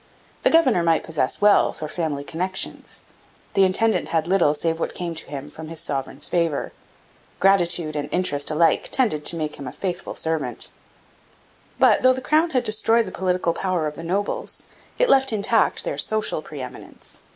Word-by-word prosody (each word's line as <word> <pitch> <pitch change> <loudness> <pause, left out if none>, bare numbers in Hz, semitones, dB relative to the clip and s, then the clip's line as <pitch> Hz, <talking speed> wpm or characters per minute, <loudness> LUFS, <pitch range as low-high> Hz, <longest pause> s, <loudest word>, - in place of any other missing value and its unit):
The - - +3
governor 270 - +4
might 165 -1 +2
possess 150 -5 0
wealth, 205 -5 +3
or - - -3
family 150 -3 -3
connections. 185 +6 -3 0.5
The 195 - +4
intendant 220 +4 +1
had 160 -1 0
little 175 -5 +3
save 165 +1 -1
what - - -3
came 175 -2 -4
to 160 - -8
him 140 0 -7
from 160 +1 -10
his 165 0 -5
sovereign's 140 +1 -3
favour. 165 -5 -1 0.7
Gratitude 175 -5 +3
and 145 0 -3
interest 145 -6 +1
alike 165 +2 +2
tended 215 - +1
to - - +2
make 155 -2 -4
him 140 - -8
a - - -5
faithful 180 -2 -5
servant. 155 -7 -1 1.1
But, - - +4
though 255 0 +5
the 260 - -4
crown 310 +6 +2
had 255 -5 0
destroyed 225 +1 +3
the 190 - -7
political 180 -2 0
power 185 -4 -1
of 150 - -3
the 165 - -8
nobles, 195 +4 -3 0.3
it - - +3
left 265 - +5
intact 220 +1 +1
their 145 - -4
social 215 -1 +1
pre 150 -2 -9
eminence. 125 - -11
170 Hz, 175 wpm, -22 LUFS, 155-205 Hz, 1.1 s, though